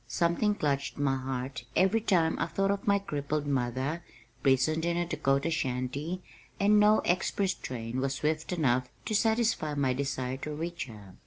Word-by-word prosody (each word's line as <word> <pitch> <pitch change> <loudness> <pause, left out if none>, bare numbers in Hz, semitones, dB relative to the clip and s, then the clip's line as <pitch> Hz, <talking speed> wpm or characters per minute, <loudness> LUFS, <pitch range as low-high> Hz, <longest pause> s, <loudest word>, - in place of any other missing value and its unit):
Something 170 - +1
clutched 140 -6 -1
my 140 -2 +1
heart 130 -1 -4
every 200 +4 +3
time 170 -6 +2
I - - 0
thought 195 +3 +1
of 200 0 -3
my 200 0 +5
crippled 150 -6 -2
mother 135 +4 -1 0.4
prisoned 135 +5 +3
in 170 0 0
a 175 - +1
Dakota 140 -1 0
shanty 140 +5 -2 0.4
and 210 +1 +5
no 210 +1 +5
express 190 +2 +1
train 120 0 -5
was 135 0 0
swift 155 +3 -1
enough 130 -7 +1 0.2
to - - -2
satisfy 220 -8 +2
my 135 -3 +1
desire 130 -1 -2
to 150 +2 -5
reach 170 0 -4
her. 105 -5 -12
150 Hz, 165 wpm, -30 LUFS, 130-180 Hz, 0.4 s, my